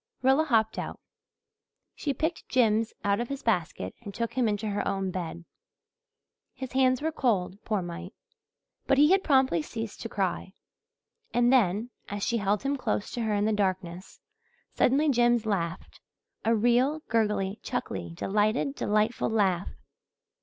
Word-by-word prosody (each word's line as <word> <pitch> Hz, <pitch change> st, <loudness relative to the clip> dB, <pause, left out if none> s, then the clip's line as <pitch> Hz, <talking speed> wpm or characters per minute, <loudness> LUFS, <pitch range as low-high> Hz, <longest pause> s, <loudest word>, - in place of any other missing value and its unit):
Rilla 270 Hz, +4 st, +4 dB
hopped 225 Hz, -5 st, +2 dB
out. -, -, -5 dB, 0.9 s
She 290 Hz, -, -2 dB
picked 320 Hz, +5 st, -3 dB
Jims 225 Hz, -3 st, +2 dB
out 200 Hz, 0 st, +2 dB
of 240 Hz, -, -3 dB
his 275 Hz, -1 st, -5 dB
basket 170 Hz, -, -1 dB
and 200 Hz, -1 st, -9 dB
took 230 Hz, -1 st, -2 dB
him 250 Hz, -3 st, +1 dB
into 210 Hz, 0 st, -1 dB
her 205 Hz, -, -1 dB
own 195 Hz, -1 st, -1 dB
bed. 170 Hz, -1 st, -5 dB, 1.1 s
His 260 Hz, -2 st, -6 dB
hands 260 Hz, +1 st, +2 dB
were 320 Hz, -, +1 dB
cold, 205 Hz, -8 st, -1 dB
poor 210 Hz, -5 st, 0 dB
mite. 175 Hz, +2 st, -7 dB, 0.7 s
But 275 Hz, -, +3 dB
he 300 Hz, +4 st, +6 dB
had 385 Hz, 0 st, +4 dB
promptly 265 Hz, -, +3 dB
ceased 225 Hz, +7 st, -6 dB
to 230 Hz, -, -5 dB
cry. 190 Hz, -1 st, -2 dB, 0.8 s
And 245 Hz, +1 st, +4 dB
then, 220 Hz, 0 st, +2 dB, 0.2 s
as 205 Hz, 0 st, -4 dB
she 235 Hz, -, +1 dB
held 205 Hz, +1 st, 0 dB
him 280 Hz, +1 st, 0 dB
close 220 Hz, -5 st, -2 dB
to 240 Hz, -, -3 dB
her 220 Hz, -2 st, 0 dB
in 205 Hz, 0 st, +1 dB
the 220 Hz, -, +2 dB
darkness, 185 Hz, -3 st, -2 dB, 0.5 s
suddenly 285 Hz, +5 st, +3 dB
Jims 240 Hz, -4 st, +3 dB
laughed 180 Hz, -5 st, -3 dB, 0.4 s
a 230 Hz, +1 st, +3 dB
real, 245 Hz, +7 st, +2 dB
gurgly, 210 Hz, -3 st, 0 dB
chuckly, 85 Hz, -1 st, -4 dB
delighted, 215 Hz, -, +1 dB
delightful 215 Hz, -2 st, 0 dB
laugh. 195 Hz, -5 st, +1 dB
220 Hz, 155 wpm, -28 LUFS, 195-255 Hz, 1.1 s, he